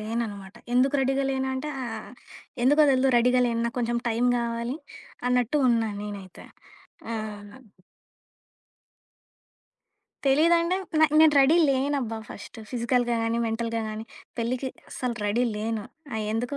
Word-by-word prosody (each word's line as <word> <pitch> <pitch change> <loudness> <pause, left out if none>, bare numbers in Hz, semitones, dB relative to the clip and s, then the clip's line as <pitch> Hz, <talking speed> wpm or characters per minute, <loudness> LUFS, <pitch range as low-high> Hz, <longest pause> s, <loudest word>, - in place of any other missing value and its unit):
లేననమాట. 215 -3 -4 0.2
ఎందుకు 265 +3 +3
రెడీగా 270 +1 +1
లేనంటే 265 +2 -2
ఆహ్, 225 -1 -6 0.5
ఎందుకో 295 +3 +6
తెలీదు 260 0 +3
రెడీగా 250 +1 +3
లేను. 230 0 -1
నాకు 235 +2 -4
కొంచెం 235 0 0
టైం 235 +2 +1
గావాలి 235 +3 -2 0.5
అన్నట్టు 250 +3 +2
ఉన్నా 230 -2 +2
నేనైతే. 200 -3 -8 0.7
ఆహ్ 205 -2 -6 2.7
తెలీదండే 335 +6 +4 0.2
న - - +6 0.2
నేను 315 -1 +7
రెడీ 275 +5 +6
లేనబ్బా 265 -4 0
ఫస్టు. 225 - -10
ఫిజికల్‌గా 240 -1 +1
గానీ, 230 +1 0
మెంటల్‌గా 230 0 -2
గానీ 215 +1 -5 0.3
పెళ్లికి 250 +3 -1 0.2
అసలు 250 -2 -3
రెడీ 215 +4 +1
లేను. 220 0 -2 0.3
ఆహ్, 220 -1 -2
ఎందుకో 245 +5 -2
235 Hz, 120 wpm, -26 LUFS, 225-265 Hz, 2.7 s, నేను